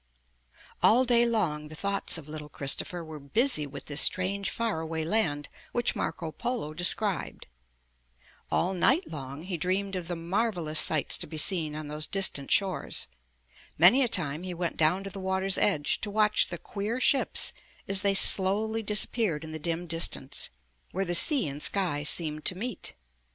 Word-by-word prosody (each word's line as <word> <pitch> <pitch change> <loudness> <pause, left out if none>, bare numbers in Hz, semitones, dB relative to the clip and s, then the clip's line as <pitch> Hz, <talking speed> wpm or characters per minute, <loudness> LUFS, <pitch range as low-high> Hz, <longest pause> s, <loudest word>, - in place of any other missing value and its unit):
All 250 +4 +5
day 240 -1 +4
long 160 -10 -1
the 155 - -10
thoughts 200 +1 -1
of 155 -3 -11
little 150 -1 -8
Christopher 155 +5 -2
were 155 -1 -9
busy 150 - 0
with 140 0 -10
this 145 0 +1
strange 190 0 +1
far 225 -1 -2
away 160 0 -3
land 160 -7 0 0.3
which 240 0 +1
Marco 165 -2 -4
Polo 235 -8 -4
described. 185 +4 -1 1.0
All 185 +3 0
night 265 - +2
long 140 0 -8
he 180 -1 -4
dreamed 190 +4 -2
of 180 -2 -5
the 175 - -3
marvelous 170 -2 0
sights 155 -4 +2
to - - -5
be 160 - -8
seen 155 -2 +2
on 155 -1 -6
those 150 +1 -4
distant 190 -8 +1
shores. 190 - 0 0.7
Many 185 - +7
a 255 - +3
time 160 -8 0
he 180 -1 -6
went 170 0 -3
down 170 +5 +2
to 195 - -7
the 195 - -8
water's 190 0 -1
edge 150 -8 +1
to 210 - -4
watch 210 0 +2
the 175 - -6
queer 210 +8 -4
ships 270 +1 +2 0.3
as 195 -1 +2
they 200 0 +2
slowly 210 +4 +3
disappeared 210 -5 0
in 160 - -8
the 155 - -6
dim 170 +2 -3
distance, 165 -5 -4 0.4
where 195 +1 -3
the 175 - -2
sea 255 - +6
and 145 +1 -7
sky 180 -7 0
seemed 155 0 +1
to 180 - +4
meet. 225 -1 -5
180 Hz, 170 wpm, -28 LUFS, 155-205 Hz, 1.0 s, Many